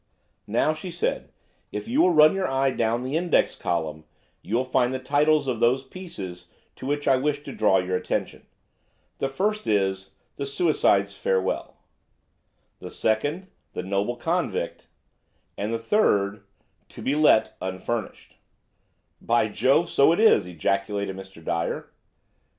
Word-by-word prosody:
"Now," 120 +8 +2
she 155 +4 -7
said, 470 - -2 0.4
"if - - -5
you 260 +6 +2
will - - +5
run 155 -2 +6
your 195 -1 -1
eye 135 0 +1
down 115 0 0
the 130 +3 -3
index 170 +1 +2
column 80 -2 -3 0.4
you 110 - -3
will 125 +2 +1
find 130 -1 +1
the 130 - -1
titles 145 +3 +2
of 125 -4 -1
those 125 +3 +2
pieces 130 - -9 0.3
to 130 - -7
which 145 +1 -2
I 135 - +5
wish 145 +2 -1
to 140 - -7
draw 105 -3 +3
your 90 0 0
attention. - - -4 0.7
The 135 - -1
first 210 +8 -1
is 95 -2 0 0.2
'The 140 - -3
Suicide's 135 - +2
Farewell;' 95 -1 -1 1.0
the - - -8
second, 145 - -1 0.2
'The - - -4
Noble 100 +5 -1
Convict;' 165 - -2 0.7
the 110 +3 -2
third, 105 - +1 0.4
'To - - -11
be 135 - +1
Let, 150 -7 +4
Unfurnished.'" 95 +4 -5 0.8
"By 115 -2 +2
Jove! 135 +10 +2
so 140 -1 +4
it 170 - +1
is!" 215 - +5
ejaculated 100 +3 -2
Mr. 95 -4 -12
Dyer. 85 +2 -2
125 Hz, 145 wpm, -25 LUFS, 100-150 Hz, 1.0 s, run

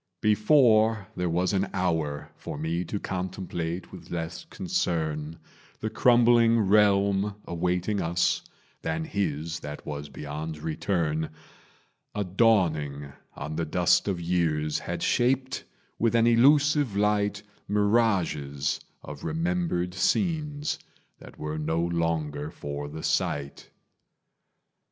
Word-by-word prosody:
Before 110 -2 +4
there 90 -1 -1
was 90 +4 +1
an 95 0 +1
hour 80 -6 -1
for - - -7
me 80 +3 -1
To 100 +4 -3
contemplate 90 -2 -4
with - - -11
less 80 - -4
concern 80 - -2 0.4
The 110 - -3
crumbling 120 0 +5
realm 100 -1 +3
awaiting 90 +4 -1
us 85 +1 +1 0.4
Than 80 0 -2
his 80 -4 -2
that 75 -1 -8
was 75 0 -5
beyond 75 +2 -6
return, 80 0 -1 0.9
A 105 - 0
dawning 80 -9 +1 0.2
on 75 +2 -5
the 85 - 0
dust 90 +3 +3
of 95 -3 -1
years 80 -3 0
Had - - -4
shaped 130 +1 +1 0.3
with 115 0 +2
an 115 0 +5
elusive 140 0 +4
light 105 0 +1 0.2
Mirages 100 -10 +1 0.2
of 75 -1 -9
remembered 165 - -1
scenes 150 - 0 0.4
That - - -13
were 75 0 -4
no 80 +2 0
longer 80 -3 -1
for 75 -1 -6
the 80 +1 -7
sight. 70 -1 -1
90 Hz, 115 wpm, -27 LUFS, 80-110 Hz, 0.9 s, crumbling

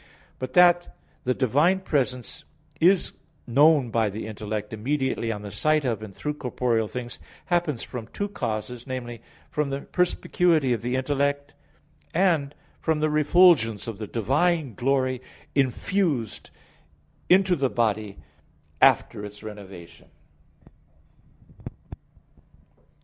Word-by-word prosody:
But 130 - -5
that 175 -1 +4 0.3
the 125 0 +1
divine 150 - +2
presence 130 -8 -2 0.4
is 180 +2 +3 0.3
known 140 0 +4
by 110 -2 +1
the 105 +2 -6
intellect 105 0 -5
immediately 130 0 -1
on 105 -2 -5
the 100 - -7
sight 155 +8 +1
of, 115 -4 -1
and 110 -2 -8
through, 150 - -3
corporeal 125 -5 -1
things, 120 +1 -7 0.3
happens 170 -8 0
from 120 -3 -7
two 200 - -4
causes 120 - -4
viz. 120 -2 -6 0.3
from 150 -2 -1
the 135 0 -3
perspicuity 170 -5 +1
of 115 - -3
the 125 +2 -2
intellect, 140 +2 -1 0.6
and 160 -6 +2 0.2
from 160 -1 0
the 155 0 +1
refulgence 150 - +4
of 110 -3 -6
the 110 - -5
divine 140 - +1
glory 130 +2 0 0.3
infused 140 - 0 0.8
into 185 0 +5
the 135 -4 0
body 110 -4 -1 0.6
after 105 - +4
its 105 +1 -9
renovation. 95 -5 -11
130 Hz, 115 wpm, -25 LUFS, 110-155 Hz, 0.8 s, into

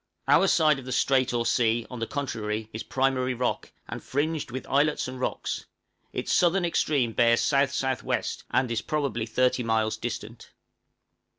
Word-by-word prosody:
Our 195 - +5
side 155 -5 +4
of 130 - -11
the 130 - -6
strait 130 0 +2
or 120 -1 -1
sea, 115 -1 +2
on 125 - -6
the 115 - -2
contrary, 110 -6 -3
is 110 - -4
primary 130 -1 0
rock, 125 +1 -2 0.2
and - - -7
fringed 150 +2 -2
with 130 +2 -6
islets 145 +1 +1
and 130 0 -7
rocks; - - -3 0.5
its - - -2
southern 180 +1 +3
extreme 145 -7 +1
bears 115 +1 +3
S.S.W., 135 -1 +1 0.3
and 130 -2 +1
is 115 -3 0
probably 130 -7 -2
30 125 +2 +1
miles 110 -1 0
distant. 115 0 -7
130 Hz, 160 wpm, -26 LUFS, 115-140 Hz, 0.5 s, Our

